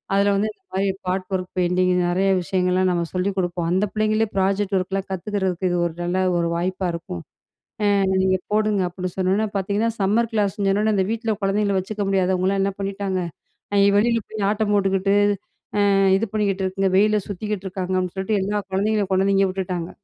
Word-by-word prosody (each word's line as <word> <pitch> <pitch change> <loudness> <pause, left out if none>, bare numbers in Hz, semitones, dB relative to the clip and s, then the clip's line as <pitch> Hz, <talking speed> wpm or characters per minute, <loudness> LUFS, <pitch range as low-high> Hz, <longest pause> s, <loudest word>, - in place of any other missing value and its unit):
அதில 200 0 +3
வந்து 210 +2 +1
இந்த 380 - -42
மாரி 195 +1 +1 0.2
பாட் 185 0 -1
ஒர்க் 185 -1 -4
பெயிண்டிங் 180 +1 +2 0.2
நெறைய 190 +2 +1
விஷயங்கள்லாம் 185 +1 +1
நம்ம 170 -1 0
சொல்லிக் 190 +2 -1
குடுப்போம். 175 -2 -1
அந்த 190 +3 +2
பிள்ளைங்களே 215 +1 +1
ப்ராஜெக்ட் 195 +1 +1
ஒர்க்லாம் 190 +1 -3
கத்துக்கறதுக்கு 190 -1 -1
இது 175 - 0
ஒரு 165 - -8
நல்ல 175 +2 -1 0.2
ஒரு 170 0 0
வாய்ப்பா 185 +2 -1
இருக்கும். 165 - -6 0.6
அ - - +4 0.4
நீங்க 185 0 +3 0.2
போடுங்க" 210 -2 +2
அப்டின்னு 180 0 -5
சொன்னோனே 190 +4 +1
பாத்தீங்கன்னா, 205 +4 0
சம்மர் 220 +4 +2
கிளாஸ்ன்னு 205 -1 0
சொன்னவுன்னே, 210 +2 +2
அந்த 190 -1 +2
வீட்ல 225 -1 -1
குழந்தைங்க 200 0 +1
வச்சுக்க 210 +3 -5
முடியாதவங்களாம் 190 0 +1
என்ன 195 - 0
பண்ணிட்டாங்க, 195 -1 -2 0.6
இ - - +5
வெளியில 230 +2 +3
போயி 215 0 -7
ஆட்டம் 215 0 0
போட்டுக்குட்டு, 195 -1 +2 0.8
அ - - +3 0.3
இது 225 - -1
பண்ணிக்கிட்டு 200 -2 0
இருக்குங்க. 190 +1 0
வெயிலில 210 +1 +4
சுத்திக்கிட்ருக்காங்க 190 -2 -4
அப்டின்னு 185 -1 -2
சொல்லிட்டு 195 +2 0
எல்லா 205 +2 -1
குழந்தைங்களையும் 205 +1 0
கொண்டாந்து 195 +1 +3
இங்க 195 - +4
விட்டுட்டாங்க. 180 -2 -3
195 Hz, 170 wpm, -22 LUFS, 185-205 Hz, 0.8 s, இ